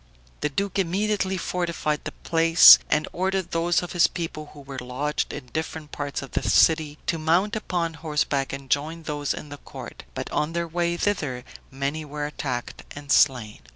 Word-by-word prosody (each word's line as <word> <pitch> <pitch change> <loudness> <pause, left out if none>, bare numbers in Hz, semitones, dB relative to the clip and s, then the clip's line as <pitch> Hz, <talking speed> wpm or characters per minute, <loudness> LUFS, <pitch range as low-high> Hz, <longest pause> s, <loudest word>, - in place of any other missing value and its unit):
The 150 - -1
duke 200 +6 -2
immediately 190 +1 0
fortified 170 -4 -2
the - - -3
place, 165 +1 +7
and 155 0 +1
ordered 190 -1 -1
those 170 +1 +1
of 175 - -6
his 175 -1 +4
people 160 -3 -6
who 145 - -12
were 135 -1 -7
lodged 130 +4 -2
in 130 -4 -8
different 160 -1 -4
parts 145 -1 -4
of 135 - -10
the - - -1
city 155 -2 +3
to 165 - -1
mount 175 +7 +2
upon 175 -6 -2
horseback 150 -3 -1
and 135 0 -7
join 155 +5 -1
those 145 -2 -2
in 150 - -5
the 145 - -8
court; - - -10
but, - - -4
on 150 +2 -1
their 170 0 -1
way 170 +1 -1
thither, 150 -12 -1 0.3
many 140 +4 -3
were 150 0 -5
attacked 130 -4 -4
and 145 -1 -7
slain. 125 -7 +3
155 Hz, 180 wpm, -25 LUFS, 145-170 Hz, 0.3 s, place